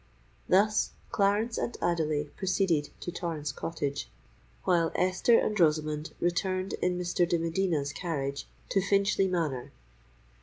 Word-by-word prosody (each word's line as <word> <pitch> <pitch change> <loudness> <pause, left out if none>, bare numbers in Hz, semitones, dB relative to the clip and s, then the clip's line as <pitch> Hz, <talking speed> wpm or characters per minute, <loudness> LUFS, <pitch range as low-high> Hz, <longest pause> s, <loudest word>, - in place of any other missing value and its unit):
Thus, 210 +3 +3 0.2
Clarence 210 +4 +1
and 240 - -3
Adelais 155 -4 0
proceeded 185 -5 +1
to 175 - -4
Torrens 165 -5 -3
Cottage, 140 -1 -3 0.5
while 170 -3 +2
Esther 185 +6 +4
and - - +1
Rosamond 155 -1 +1
returned 185 +2 0
in 180 0 +1
Mr. 175 -1 +1
de 170 - +3
Medina's 165 -3 0
carriage 140 -6 -3 0.2
to 195 - +2
Finchley 195 0 +2
Manor. 150 -7 -2
175 Hz, 120 wpm, -29 LUFS, 150-190 Hz, 0.5 s, Esther